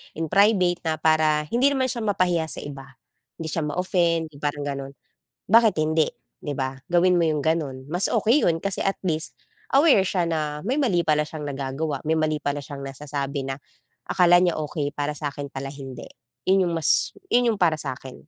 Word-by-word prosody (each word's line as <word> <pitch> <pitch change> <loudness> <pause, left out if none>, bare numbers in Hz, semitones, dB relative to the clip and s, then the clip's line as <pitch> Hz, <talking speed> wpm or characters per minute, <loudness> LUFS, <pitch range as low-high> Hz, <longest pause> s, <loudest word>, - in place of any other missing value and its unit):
"In 160 -1 -4
private 190 -3 +4
na 160 - +1
para 155 -1 +2
hindi 250 +4 +3
naman 260 -3 +1
siya 240 - -4
mapahiya 180 -6 +1
sa - - -4
iba." 135 -1 -8 0.5
Hindi 160 -2 -5
siya 155 -2 -1
ma-offend 170 -1 0
'yong 140 - -14
parang 145 0 -2
ganon. 140 -1 -5 0.6
Bakit 225 -2 +6
hindi, 155 0 +2 0.3
di 145 - -5
ba? 130 0 -3
Gawin 175 +1 +3
mo 165 - +2
yung 150 -2 0
gano’n. 145 -4 -2
Mas 180 +3 +3
okey 240 +7 +2
'yon 165 -1 +1
kasi 200 -1 -2
at 195 - 0
least 160 -4 -2 0.4
aware 275 - +5
siya 185 -2 0
na 150 -2 -2
may 255 +9 -1
mali 195 -12 +2
pala 150 -2 +1
siyang 155 -1 -7
nagagawa, 140 +2 -3
may 160 - +2
mali 155 -1 0
pala 145 0 -3
siyang 140 -1 -8
nasasabi 140 0 -4
na 135 +1 -4 0.5
akala 175 -1 +5
niya 175 -2 +2
okey, 145 -1 -3
para 145 0 -2
sa'kin 145 -1 -5
pala, 135 0 -6
hindi. 135 -2 -9 0.4
‘Yon 190 0 +4
yung 170 - -2
mas 160 - +3 0.2
'yon 245 -1 +4
yung - - -9
para 170 -3 +3
sa'kin. 130 0 -6
160 Hz, 190 wpm, -24 LUFS, 145-180 Hz, 0.6 s, Bakit